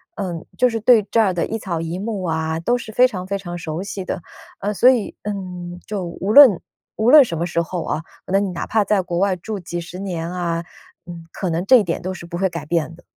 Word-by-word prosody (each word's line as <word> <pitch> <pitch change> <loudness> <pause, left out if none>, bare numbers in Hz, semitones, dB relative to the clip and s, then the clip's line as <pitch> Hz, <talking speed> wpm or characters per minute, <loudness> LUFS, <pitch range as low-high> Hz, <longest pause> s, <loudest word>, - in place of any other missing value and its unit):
嗯， 175 -5 -4
就 250 - +4
是 225 -2 -2
对 225 0 +5
这 230 - +4
儿 195 -4 +2
的 175 - 0
一 225 - -3
草 175 -5 -3
一 165 +2 -4
木 205 -2 -3
啊， 160 -1 -1
都 240 +9 +1
是 230 -2 -8
非 250 +4 +5
常 185 -7 -6
非 200 +1 -1
常 175 -3 -7
熟 160 0 -4
悉 200 -1 -5
的。 - - -4 0.4
呃， 205 +2 -2
所 245 +5 +6
以， 245 -5 +1
嗯， 180 -4 -6
就 205 -3 -3
无 180 +4 -3
论 260 -10 +9 0.4
无 220 +3 +2
论 295 0 +9
什 170 - -4
么 170 - -1
时 170 - -1
候 170 +1 -4
哦， 155 - -2 0.2
那 195 +1 +2
你 200 -1 -1
哪 170 - -5
怕 220 -1 +2
在 200 0 +2
国 175 -1 -4
外 195 -1 +2
住 210 +4 -6
几 175 0 -5
十 175 +2 -9
年 170 -4 -4
啊， 170 -2 -2 0.4
嗯， 170 -1 -9
可 185 - -3
能 165 +3 -1
这 255 +5 +7
一 225 - +3
点 170 -3 -2
都 185 +2 -4
是 180 - -9
不 170 0 -5
会 190 +1 +2
改 170 -1 -6
变 165 0 -1
的。 175 - -18
185 Hz, 275 characters per minute, -21 LUFS, 170-210 Hz, 0.4 s, 论